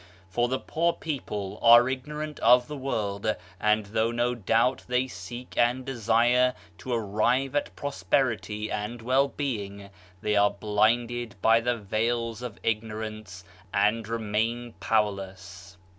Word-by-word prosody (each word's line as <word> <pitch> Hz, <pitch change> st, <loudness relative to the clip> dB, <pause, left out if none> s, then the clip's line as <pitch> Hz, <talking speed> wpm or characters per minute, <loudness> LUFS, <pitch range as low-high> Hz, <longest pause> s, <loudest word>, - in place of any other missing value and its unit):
For 120 Hz, +4 st, +1 dB
the 130 Hz, +2 st, 0 dB
poor 170 Hz, +4 st, 0 dB
people 105 Hz, -10 st, -5 dB
are 120 Hz, +1 st, +8 dB
ignorant 150 Hz, +3 st, -4 dB
of 125 Hz, +1 st, +5 dB
the 150 Hz, -, -6 dB
world, 110 Hz, -6 st, -2 dB, 0.2 s
and 105 Hz, 0 st, +2 dB
though 110 Hz, +2 st, 0 dB
no 120 Hz, +1 st, 0 dB
doubt 115 Hz, +3 st, +1 dB
they 125 Hz, +1 st, +1 dB
seek 125 Hz, -1 st, -9 dB
and 125 Hz, +2 st, +2 dB
desire 120 Hz, 0 st, +2 dB, 0.2 s
to 130 Hz, -, -6 dB
arrive 120 Hz, +5 st, +1 dB
at 145 Hz, -, -1 dB
prosperity 115 Hz, -6 st, -1 dB
and 105 Hz, +4 st, -3 dB
well 130 Hz, +3 st, +3 dB
being, 100 Hz, -9 st, -5 dB, 0.3 s
they 105 Hz, +1 st, 0 dB
are 105 Hz, 0 st, +5 dB
blinded 110 Hz, +3 st, 0 dB
by 115 Hz, +3 st, +5 dB
the 120 Hz, +1 st, 0 dB
veils 115 Hz, +2 st, -1 dB
of 120 Hz, -4 st, -6 dB
ignorance 110 Hz, -4 st, -4 dB, 0.3 s
and 105 Hz, +2 st, +1 dB
remain 115 Hz, +1 st, -2 dB
powerless. 95 Hz, -3 st, -2 dB
115 Hz, 130 wpm, -27 LUFS, 105-125 Hz, 0.3 s, are